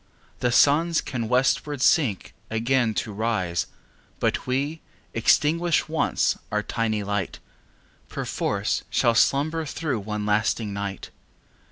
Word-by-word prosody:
The 125 - +1
Suns 155 +6 +4
can 120 -4 -3
westward 130 +3 +1
sink 125 - +2 0.2
again 115 0 +1
to 110 - -2
rise 100 -6 -1 0.5
But - - -1
we, 140 +5 -1 0.3
extinguished 155 +9 +2
once 160 - +1
our 105 0 0
tiny 110 -2 -1
light, 100 -2 -2 0.7
5 - - -37
Perforce - - -2
shall 120 - +3
slumber 150 +7 +2
through 150 -4 -3
one 105 +1 -4
lasting 105 0 0
night! 100 -1 -5
115 Hz, 120 wpm, -25 LUFS, 105-145 Hz, 0.7 s, Suns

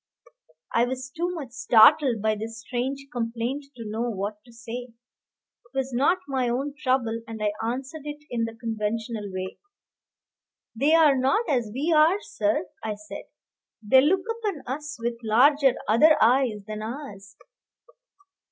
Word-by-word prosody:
I 235 - +4
was 260 +1 -5
too 345 +2 -1
much 280 -7 -7
startled 255 -1 +5
by 220 0 +3
this 225 +2 -6
strange 260 +4 -3
complaint 240 +3 -3
to 230 -3 -8
know 225 +3 -2
what 210 0 -4
to 240 - -17
say. 240 +1 -7
It 240 +1 -32
was 265 -1 -1
not 280 +9 +3
my 260 -3 0
own 270 +4 -2
trouble, 255 -5 0
and 225 -1 -7
I 210 -1 0
answered 260 +6 -4
it 295 0 -7
in 230 -1 0
the 225 0 -7
conventional 220 -2 -3
way. 185 0 -5 1.2
"They 285 +7 +3
are 310 -4 +6
not 270 - +1
as 245 -8 0
we 290 +8 0
are, 320 +6 +5
sir," 210 - -1 0.2
I 215 -1 -2
said; 205 -1 -9 0.6
"they 260 +5 +6
look 365 +6 +2
upon 410 -10 -3
us 300 +4 -5
with 235 0 -3
larger, 265 +4 +4
other 305 +9 +6
eyes 235 -3 +3
than 215 0 -6
ours." 215 -5 -8
245 Hz, 150 wpm, -25 LUFS, 225-275 Hz, 1.2 s, are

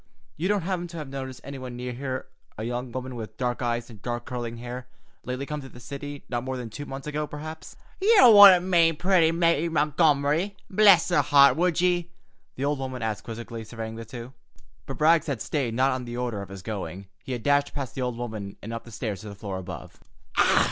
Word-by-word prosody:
You 170 +4 -1
don't 205 -3 +1
happen 175 -1 -2
to 170 0 -9
have 150 -4 -6
noticed 130 -1 -6
anywhere 135 -2 -7
near 125 0 -5
here, 130 +1 -4 0.3
a 110 - -4
young 120 +1 -3
woman 130 +1 -5
with 110 -2 -7
dark 125 -1 -1
eyes 120 -1 -1
and 110 -4 -13
dark, 120 0 -4
curling 120 -2 -5
hair, 125 +2 -7 0.4
lately 125 +2 -3
come 150 +1 -4
to 135 - -10
the 120 - -13
city—not 140 -2 -6
more 130 0 -3
than 120 -3 -6
two 145 +6 -7
months 135 0 -7
ago, 150 0 -2
perhaps?" 155 +2 -8 0.3
"You 395 - +7
wouldn't 195 -3 +10
be - - -4
meanin' 165 -2 +5
pretty 175 -1 +3
Mary 170 -1 +2
Montgomery—bless 165 +6 +3
her 150 - +4
heart!—would 145 +5 +5
ye?" 175 -1 +1 0.5
the 135 - -2
old 145 -1 0
woman 130 -2 -4
asked 110 -1 -3
quizzically, 115 0 -6
surveying 110 0 -6
the 115 - -6
two. 120 +2 -9 0.5
But 135 - -6
Rags 160 +1 +4
had 140 -6 -2
stayed 120 -1 -2
not 130 +2 +3
on 130 -1 -3
the 120 0 -6
order 120 -5 -2
of 100 - -8
his 95 -1 -9
going. 100 -2 -5 0.2
He 130 - -4
had 120 -3 -5
dashed 145 0 +2
past 140 -4 -4
the 130 - -4
old 125 -2 -2
woman 110 -5 -6
and 115 +3 -6
up 115 - -6
the 120 - -12
stairs 110 -3 -4
to 110 - -8
the 100 - -8
floor 100 -2 -5
above. 90 -5 -9
130 Hz, 215 wpm, -26 LUFS, 120-155 Hz, 0.5 s, wouldn't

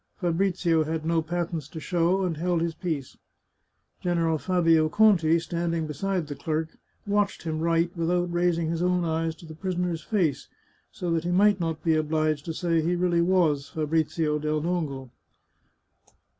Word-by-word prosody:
Fabrizio 175 -2 +1
had 160 0 -3
no 165 0 +2
patents 165 -2 -3
to 160 - -8
show, 175 +3 +1
and 175 -3 -1
held 175 +1 0
his 165 0 -1
peace. 155 -7 -4 0.8
Gen 175 -1 0
eral 165 -2 +1
Fabio 165 -4 +3
Conti, 170 -6 +4
standing 170 0 -2
beside 175 +4 -2
the 145 - -6
clerk, 155 +3 -2 0.4
watched 205 -1 0
him 160 -2 -3
write 170 +2 +1
without 175 +1 0
raising 170 -2 +1
his 170 0 -2
own 180 -1 +1
eyes 160 0 -1
to 170 - -14
the 160 - -9
prisoner's 175 -1 -2
face, 175 -10 -1 0.4
so 175 -2 -4
that 165 -1 0
he 175 - -2
might 200 +2 +4
not 165 -2 -3
be 165 - +3
obliged 155 -1 0
to 165 - -3
say 165 -1 +1
he 170 +3 0
really 175 -1 +2
was 170 -6 +2
Fabrizio 155 0 0
del 155 0 -1
Dongo. 145 -7 -3
165 Hz, 165 wpm, -26 LUFS, 160-175 Hz, 0.8 s, Conti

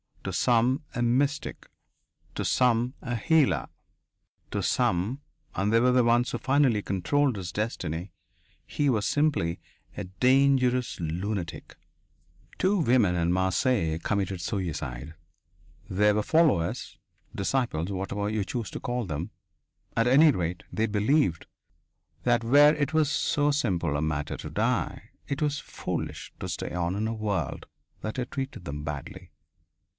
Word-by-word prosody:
To - - -4
some, 125 +4 +2
a 120 - -1
mystic. 140 +5 0 0.7
To - - -2
some, 125 0 +2
a 120 -3 -3
healer. 115 - +2 0.8
To - - -1
some 105 +11 0 0.3
and 100 +3 0
they 115 - +6
were 125 +2 +4
the 125 0 +4
ones 120 +1 +3
who - - -2
finally 130 -5 +2
controlled 125 +7 +1
his 90 -3 -5
destiny 90 -5 -3 0.5
he 145 -2 0
was 110 -5 +1
simply 145 - +1 0.4
a 100 - -4
dangerous 125 +4 +2
lunatic. 85 +2 -4 0.8
Two 195 +1 +2
women 120 - +3
in 85 0 +1
Marseilles 95 - +1
committed 95 -3 -1
suicide 80 -6 -4 0.7
they 105 +2 +3
were 105 0 +1
followers, 145 - +1 0.4
disciples, 100 -5 -1
whatever 100 +2 -2
you 105 -1 -1
choose 115 +3 -4
to - - -5
call 125 -1 -2
them. 80 +3 -4 0.6
At 115 +1 +2
any 150 +5 +7
rate, 90 -6 -3
they 110 +1 0
believed 105 - +1 0.8
that 120 -1 +2
where 145 +6 +6
it 145 0 -1
was 155 -2 +3
so 145 0 +1
simple 90 - 0
a 70 - 0
matter 75 -1 -2
to - - -7
die, - - -1 0.2
it 140 0 -3
was 145 0 0
foolish - - -5
to - - -5
stay - - -4
on 90 +1 -1
in 105 +2 -1
a 115 - -2
world 100 - -3 0.3
that 110 +3 -4
had 125 0 -3
treated 135 -7 -5
them 75 +1 -5
badly. 75 -2 -7
110 Hz, 140 wpm, -27 LUFS, 90-130 Hz, 0.8 s, any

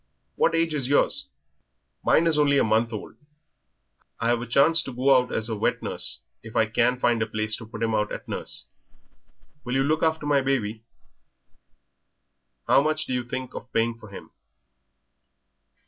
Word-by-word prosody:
What - - +2
age 165 -1 +1
is 140 -4 -1
yours?" 275 - +1 0.8
"Mine 165 - +4
is 165 -2 +3
only 140 -1 +4
a - - +4
month 110 +2 +1
old. 110 - -7 1.0
I've 115 0 +1
a 120 - -6
chance 155 +7 +4
to 135 - -7
go 130 +2 +3
out 125 -1 +2
as 110 - -1
wet 110 - -1
nurse 65 - 0 0.2
if 110 0 -12
I 115 - +4
can 120 +3 +1
find 120 -2 +2
a 110 - 0
place 110 0 -3
to 115 - -10
put 115 0 -6
him 115 -1 0
out 105 -1 0
at - - -7
nurse. - - -4 1.0
Will 125 +1 -3
you 135 - +3
look 155 +3 +1
after 160 -2 0
my 145 -1 +3
baby?" 115 -5 -1 1.9
"How - - +5
much 155 +1 0
do - - -4
you 125 -1 -1
think 130 +1 -6
of 125 - -9
paying 115 +1 +1
for 110 -2 -14
him?" 100 - -11
125 Hz, 175 wpm, -25 LUFS, 110-140 Hz, 1.9 s, How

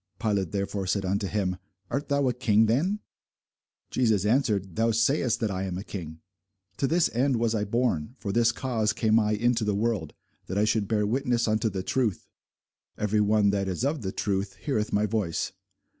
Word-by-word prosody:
Pilate 100 -6 0
therefore 100 -1 -2
said 100 +1 0
unto 100 +2 0
him, 95 -3 -1 0.3
Art 145 +2 -2
thou 140 -1 +2
a 125 - +2
king 110 -2 +3
then? 170 - +1 0.9
Jesus 110 -6 +2
answered, 105 - +1
Thou 115 +1 +2
sayest 115 +2 +2
that 110 -3 0
I 95 0 -2
am 90 -2 -3
a 95 - -5
king. 80 -6 -7 0.6
To 135 - +1
this 170 +2 +3
end 130 +3 +2
was 115 -1 +1
I 105 -2 0
born, 115 -4 +1
and 120 - -14
for 100 - -4
this 115 +2 +3
cause 115 -3 -1
came 110 -1 +3
I 105 -1 +1
into 120 +2 +1
the 105 -1 0
world, 105 -7 -1 0.3
that 95 - -3
I 105 - +3
should 110 -2 +1
bear 105 -1 +1
witness 120 +1 +1
unto 110 +1 +1
the 95 -2 -4
truth. 115 -3 -1 0.7
Every 105 0 +1
one 105 -1 +3
that 100 -1 -1
is 95 +7 -2
of 145 0 -1
the 95 -3 -3
truth 100 0 -2
heareth 110 -7 -2
my 105 +1 +2
voice. 105 -6 -1
110 Hz, 195 wpm, -27 LUFS, 100-120 Hz, 0.9 s, king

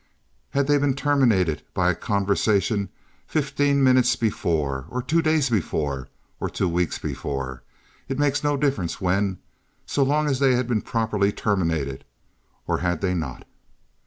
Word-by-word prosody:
Had 140 0 +1
they 145 +1 +3
been 140 -2 +1
terminated 120 - +2
by 90 0 +3
a - - -3
conversation 100 0 +1 0.4
fifteen 140 -2 +1
minutes 130 -1 +4
before 75 - -1
or 125 +3 -3
two 165 +5 +2
days 155 -3 +2
before 75 - -1 0.3
or - - -2
two - - -1
weeks 85 0 0
before—it 70 - -6
makes 145 0 +1
no 145 -1 +1
difference 135 - -1
when, 95 +1 0 0.5
so 145 - -1
long 145 +3 +2
as 135 -3 0
they 135 -2 +4
had 125 0 0
been 115 -4 0
properly 110 -3 0
terminated—or 80 - -3
had 90 -2 -1
they 95 -2 +1
not? 80 -8 -4
105 Hz, 140 wpm, -24 LUFS, 85-140 Hz, 0.5 s, minutes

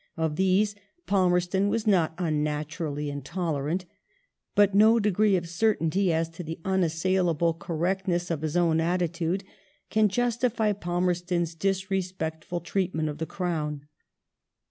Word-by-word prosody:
Of 160 -2 0
these 190 +4 +2 0.3
Palmerston 185 0 +2
was 225 +1 -1
not 175 -6 +2
unnaturally 150 -2 -2
intoler 145 0 -3
ant, 180 +3 -1 0.7
but 205 -1 +5
no 220 +3 +6
degree 210 -1 +3
of 175 -2 -1
certainty 185 -1 +1
as 165 0 +1
to 165 +2 -8
the 160 0 -6
unassailable 175 -2 +1
correctness 175 +2 -1
of 155 -3 -2
his 155 +1 -1
own 165 -2 +3
attitude 175 +1 0 0.5
can 215 -1 +4
justify 235 -1 +1
Palmerston's 175 -2 -1
disrespectful 185 -2 -2
treatment 170 -3 -1
of 150 - -6
the 160 - -3
Crown. 150 -5 -3
175 Hz, 120 wpm, -27 LUFS, 160-190 Hz, 0.7 s, no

